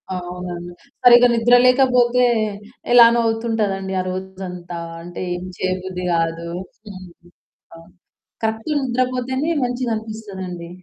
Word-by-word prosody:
అవునండి. 175 -1 -6 0.3
సరిగ్గా 245 0 +8
నిద్ర 235 +1 +4
లేకపోతే 250 -1 +4 0.7
ఎలానొ 235 -1 +7
అవుతుంటానండి 220 -4 -1
ఆరోజంతా. 185 -1 -6 0.3
అంటే, 175 0 -8
ఏం 175 - -6
చేయబుద్ది 185 0 -3
కాదు. 165 0 -1 0.4
హ్మ్. 185 -2 -10 0.7
ఆ! - - -12 0.7
కరెక్ట్‌ 220 +4 -2
నిద్రపోతేనే 255 +3 -1
మంచిగా 245 0 -2
అనిపిస్తదండి. 195 -6 -7
210 Hz, 95 wpm, -20 LUFS, 180-245 Hz, 0.7 s, సరిగ్గా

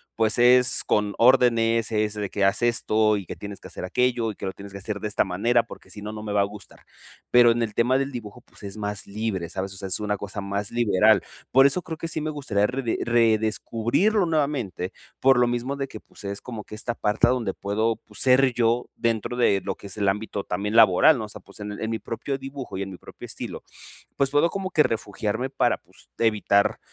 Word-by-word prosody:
pues 110 -1 +1
es 125 +1 +5
con 105 -1 0
órdenes, 115 -2 +4
es 105 -1 0
de 105 -2 -4
que: 100 +1 0
"Haz 100 +4 +2
esto, 110 -3 +2
y 100 - -6
que - - -7
tienes 100 -1 -8
que - - -11
hacer - - -8
aquello, 120 +4 0
y - - -12
que - - -7
lo 95 - -2
tienes 100 0 -11
que - - -6
hacer 105 +1 -5
de 105 - -3
esta 105 - +1
manera, 115 +6 +2
porque - - -13
si 105 - -9
no, 105 - -5
no 105 - -7
me 105 -1 -4
va 100 - +3
a - - +4
gustar". 100 -1 -9 0.5
Pero 120 -1 +7
en 115 0 +2
el 110 -2 -3
tema 125 +4 +2
del 135 +1 -1
dibujo, 110 -5 -8
pues - - -20
es 100 0 -8
más 105 0 -4
libre, 100 -4 -3
¿sabes? 95 0 -4
O - - -11
sea, 95 - -5
es 95 - -1
una 105 -1 -1
cosa 100 +1 -6
más 100 +1 -3
liberal. 110 -2 +3 0.3
Por 135 +1 +6
eso 140 +6 +3
creo 165 -2 -7
que 165 - -5
sí 155 -1 -2
me 155 - -2
gustaría, 115 -9 0
rede 125 -1 -2
redescubrirlo 120 - +1
nuevamente, 140 - -1 0.3
por 135 -1 +5
lo 120 - +4
mismo 120 +3 -2
de 135 -1 -3
que, - - -9
pues - - -17
es 100 0 -4
como 115 -4 -7
que 105 - -10
esta 120 +2 -3
parte 105 0 +2
donde 120 -6 0
puedo, 110 +3 0
pues 105 -1 -14
ser 130 0 +4
yo, 120 0 +1
dentro 115 0 -1
de 100 -5 +2
lo - - -1
que - - -11
es 100 - -9
el 100 -1 0
ámbito 105 0 -3
también 100 +4 -3
laboral, 115 - +6
¿no?, 110 - -4
o - - -12
sea, - - -10
pues - - -17
en 105 0 -5
en 110 - -2
mi 115 - -1
propio 135 +4 -4
dibujo 135 0 -7
y - - -3
en 100 - -4
mi 90 - -9
propio - - -12
estilo, - - -7 0.5
pues, 140 -1 +1
puedo 145 +4 +3
como 190 +1 -4
que 155 -3 +4
refugiarme 110 +2 -2
para, 135 - +1
pues, - - -19
evitar 105 -3 +2
110 Hz, 240 wpm, -24 LUFS, 105-125 Hz, 0.5 s, Pero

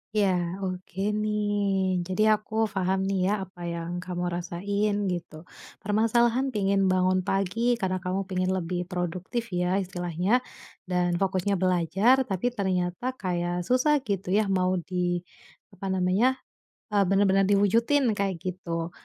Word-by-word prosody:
Iya, 205 -2 +4 0.4
oke 185 0 -5 0.2
nih. 205 -3 0
Jadi 185 +3 -1
aku 215 0 -4 0.2
paham 190 0 0
nih 195 -1 0
ya - - +2
apa 185 -1 -14
yang 170 0 -5
kamu 180 -1 -4
rasain 200 +4 -1 0.2
gitu, 170 -3 -5 0.5
permasalahan 230 +5 +2
pingin 200 -1 +1
bangun 185 0 +2
pagi 195 +2 0 0.2
karena 185 -1 -1
kamu 185 +2 -1
pingin 185 0 0
lebih 175 0 -3
produktif 180 +5 -3
ya 180 +1 0
istilahnya 180 +4 0 0.5
dan 175 -1 0
fokusnya 190 0 0
belajar, 185 +6 +3
tapi 190 +4 -2
ternyata 185 +1 -1
kayak 175 -1 -2
susah 285 +4 +3
gitu 195 -2 -2
ya, 210 +1 +3
mau 185 -1 +1
di 175 0 -1 0.6
apa 190 +1 -4
namanya, 190 +8 +2 0.5
eee, 200 -1 +3
bener-bener 195 0 +3
diwujudin, 230 +6 +3
kayak 195 -2 0
gitu. 170 -2 -4
190 Hz, 130 wpm, -27 LUFS, 180-205 Hz, 0.6 s, Iya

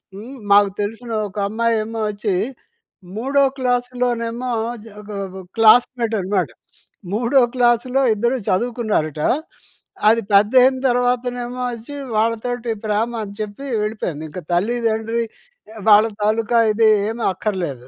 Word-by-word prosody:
హ్మ్, 235 +7 -9 0.2
మాకు 205 0 +6
తెలిసిన 225 +3 -5 0.2
ఒక 195 - -14
అమ్మాయేమోచ్చీ, 215 -2 -1 0.8
మూడో 275 +5 +2
క్లాసులోనేమో 245 -1 -1 0.3
జ 225 - -13
ఒగ 210 0 -13 0.2
ఒగగ్ 190 -1 -10
క్లాస్‌మేటున్నాడు. 215 - +3 0.6
మూడో 245 +4 +3
క్లాసులో 245 +2 +2
ఇద్దరు 240 +5 0
చదువుకున్నారటా, 200 - 0 0.8
అది 230 +1 +3
పెద్దయిన 250 +6 +5
తర్వాతనేమో 245 0 -1
ఒచ్చి, 235 +5 -9 0.2
వాళ్ళతోటి 230 +1 -1
ప్రేమ 215 +3 0
అని 200 - -8
చెప్పి 210 +6 -6 0.2
వెళ్ళిపోయింది. 180 -8 -4
ఇంక 185 - -7
తల్లి-దండ్రి, 225 +3 0 0.5
ఎ - - -13
వాళ్ళ 215 +1 +7 0.2
తాలూకా 225 +2 +1 0.2
ఇది 220 0 +4 0.2
ఏమి 230 +1 -4
అక్కర్లేదు. 170 - -4
225 Hz, 105 wpm, -20 LUFS, 210-245 Hz, 0.8 s, వాళ్ళ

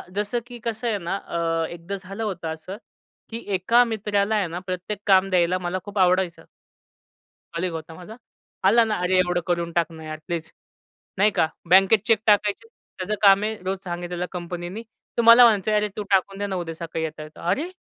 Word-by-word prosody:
जसं 210 +4 -1
की 245 -1 -10
कसं 230 0 -3
आहे 220 -3 0
ना 175 -1 -3
अ, 165 -1 -1
एकदा 170 +3 -6
झालं 195 +3 -7
होतं 175 -6 -3
असं 185 +5 -9 0.5
की 230 - -5 0.2
एका 230 +7 +4
मित्राला 210 -2 0
आहे 205 -4 +1
ना 170 +2 -5
प्रत्येक 185 +3 -4
काम 195 -1 +5
द्यायला 180 -1 +2
मला 180 +1 -3
खूप 205 -1 -4
आवडायचं. 185 -1 +2 1.1
कलीग 175 +1 -2
होता 160 0 -7
माझा. 185 +6 -11 0.5
"आला 220 +5 +5
ना, 220 -1 -1
अरे 185 +1 +2
एवढं 180 -1 +1
करून 170 -1 -1
टाक 170 -1 0
ना 160 -1 -11
यार 155 0 -6
प्लीज," 165 -2 -4 0.7
नाही 205 +3 +4
का? 160 - +2 0.2
बँकेत 195 +4 +6
चेक 225 -3 +4
टाकायचे, 210 - +2 0.3
त्याचं 195 +3 -2
काम 200 -1 +6
आहे, 220 +1 -2
रोज 190 +1 -2
सांगितलेलं 175 0 -4
कंपनीनी. 175 +3 -6 0.3
तो - - +4
मला 230 +2 +9
म्हणायचं, 215 -2 +3
"अरे 210 0 +2
तू 210 - -2
टाकून 195 0 +2
दे 205 - -2
ना 195 - -3
उद्या 170 -2 -4
सकाळी 165 -1 -5
येता-येता." 155 +1 -7
"अरे! 310 - 0
185 Hz, 190 wpm, -24 LUFS, 175-210 Hz, 1.1 s, मला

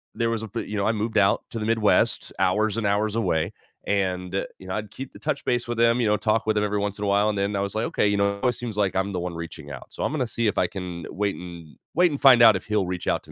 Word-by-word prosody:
there 115 -1 0
was 115 -1 -2
a - - -5
p 115 +3 -3
you 105 - -6
know, 100 - 0
I 110 - +3
moved 110 +1 -2
out 100 -1 +3
to 115 - -4
the 105 - -3
Midwest, 110 -1 +2
hours 105 +3 +2
and 115 - -1
hours 105 +1 +1
away, 90 -4 0 0.3
and, 90 -2 -1 0.3
you 95 - -12
know, 95 - -3
I'd 105 -1 -5
keep 135 0 -8
to - - -12
touch - - -3
base 120 -1 0
with 120 -1 -2
him, 115 +1 +4
you 115 - +2
know, 105 0 +3
talk 110 +1 +1
with 110 -1 +1
him 105 - +2
every 105 0 -1
once 100 -1 -2
in 105 - -2
a - - -1
while, 100 +2 +3
and 105 - -2
then 100 +1 0
I 100 - 0
was 100 +1 -2
like, 110 - 0
"Okay, - - +1
you 100 0 +1
know, 100 0 +1
it 125 - +3
seems 115 -3 -5
like 100 -3 +1
I'm 95 +1 0
the 90 - -2
one 90 0 -4
reaching 80 -3 -8
out. 65 - -10
So, - - -4
I'm - - 0
gonna 130 -5 -1
see 115 0 0
if 105 - -1
I - - +2
can 90 -3 -6
wait 100 0 -1
and 85 -4 -10 0.2
wait 175 0 +4
and 145 - -3
find 130 -3 +8
out 110 -3 +8
if - - -11
he'll 105 -3 0
reach 90 -1 -4
out - - 0
to - - -14
105 Hz, 315 wpm, -24 LUFS, 95-115 Hz, 0.3 s, find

